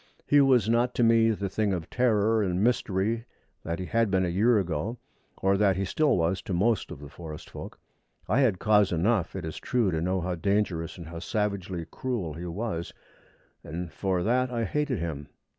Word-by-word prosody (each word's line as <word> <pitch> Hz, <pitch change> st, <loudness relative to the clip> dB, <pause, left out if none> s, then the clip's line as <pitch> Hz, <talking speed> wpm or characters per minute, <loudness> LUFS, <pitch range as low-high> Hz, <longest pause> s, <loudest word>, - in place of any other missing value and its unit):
He 145 Hz, 0 st, +5 dB
was 130 Hz, -6 st, +4 dB
not 120 Hz, +2 st, +2 dB
to 120 Hz, -, +2 dB
me 115 Hz, 0 st, +5 dB
the 100 Hz, -3 st, -1 dB
thing 100 Hz, +1 st, 0 dB
of 85 Hz, -2 st, -3 dB
terror 110 Hz, -3 st, +2 dB
and 95 Hz, -1 st, 0 dB
mystery 115 Hz, -1 st, 0 dB, 0.4 s
that 85 Hz, +1 st, -3 dB
he 95 Hz, -, -4 dB
had 115 Hz, +2 st, +1 dB
been 95 Hz, -1 st, +2 dB
a -, -, -1 dB
year 110 Hz, +7 st, +3 dB
ago, 95 Hz, +5 st, -2 dB, 0.5 s
or 95 Hz, 0 st, +3 dB
that 100 Hz, -2 st, +3 dB
he 95 Hz, +2 st, -1 dB
still 150 Hz, +7 st, +2 dB
was 85 Hz, +2 st, 0 dB
to 95 Hz, -, -3 dB
most 110 Hz, +5 st, +1 dB
of 90 Hz, -, -7 dB
the 75 Hz, -, -9 dB
forest 75 Hz, +1 st, -9 dB
folk. -, -, -9 dB, 0.5 s
I -, -, +2 dB
had 120 Hz, -9 st, +3 dB
cause 105 Hz, 0 st, +3 dB
enough, 90 Hz, +2 st, +1 dB
it 95 Hz, -4 st, -4 dB
is 80 Hz, -, -6 dB
true, 120 Hz, -6 st, 0 dB
to 80 Hz, -1 st, -1 dB
know 95 Hz, +2 st, 0 dB
how 90 Hz, +1 st, -2 dB
dangerous 90 Hz, -2 st, -1 dB
and 85 Hz, -2 st, -9 dB
how 85 Hz, 0 st, -7 dB
savagely 95 Hz, -2 st, -2 dB
cruel 115 Hz, -12 st, -3 dB
he 85 Hz, +3 st, -6 dB
was, 85 Hz, -1 st, -4 dB, 0.7 s
and 85 Hz, +2 st, -6 dB
for 95 Hz, -2 st, -1 dB
that 125 Hz, +4 st, +2 dB
I 120 Hz, -2 st, -2 dB
hated 145 Hz, 0 st, -1 dB
him. 80 Hz, -4 st, -4 dB
100 Hz, 200 wpm, -27 LUFS, 85-115 Hz, 0.7 s, He